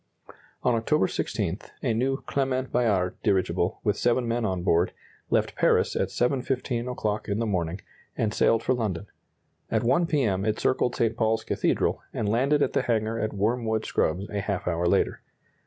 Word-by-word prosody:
On 125 - +3
October 115 +2 +2
16, - - -2 0.2
a 115 - +1
new 130 +4 0
Clement 130 -1 -1
Bayard 100 -7 +1
dirigible, 95 -2 0
with 105 -1 +2
seven 120 0 +2
men 115 0 0
on 95 -3 -1
board, 85 0 +2 0.4
left - - +1
Paris - - +2
at - - +1
7.15 125 -1 -1
o'clock 105 -4 -2
in 100 - -1
the 115 - 0
morning, 90 -3 -2 0.4
and 105 -1 0
sailed 115 +1 +3
for 130 - +2
London. 105 -6 -2 0.6
At - - +1
1 170 +8 +3
P. 150 -4 +1
M. 95 -4 0
it 110 0 0
circled 125 -1 +1
St. 115 -1 +1
Paul's 110 -1 +1
Cathedral, - - 0
and 110 - -2
landed 135 +7 +2
at - - -1
the - - +2
hangar 115 -1 0
at 110 - -1
Wormwood 110 +2 0
Scrubbs 90 +6 0
a 100 -1 -1
half 100 -2 -3
hour 85 0 +1
later. - - +1
110 Hz, 175 wpm, -26 LUFS, 100-125 Hz, 0.6 s, On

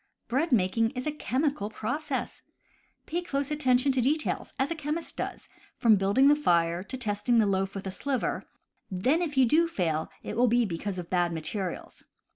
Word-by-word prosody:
Bread 280 +7 0
making 225 +1 +3
is 255 - -3
a 305 - 0
chemical 275 -6 -1
process. 260 +6 -3 0.6
Pay 345 +2 -2
close 280 -4 -2
attention 270 -2 +3
to 260 -1 +1
details, 300 +5 0
as 270 +4 0
a - - -1
chemist 310 +2 -4
does, - - -5 0.3
from 225 -3 +5
building 200 +8 +3
the 290 - +7
fire 170 - +2
to 260 +7 -6
testing 235 0 0
the 220 - +5
loaf 195 0 0
with 195 - -5
a 190 - -3
sliver; 265 +7 -2 0.5
then 255 - +1
if 300 -5 -3
you 260 - +6
do 320 +8 +4
fail 165 - -1
it - - -5
will 245 +2 +4
be 240 +1 +3
because 190 +1 -4
of 175 -2 -7
bad 175 -2 +2
materials. 170 +3 -4
245 Hz, 185 wpm, -28 LUFS, 195-285 Hz, 0.6 s, the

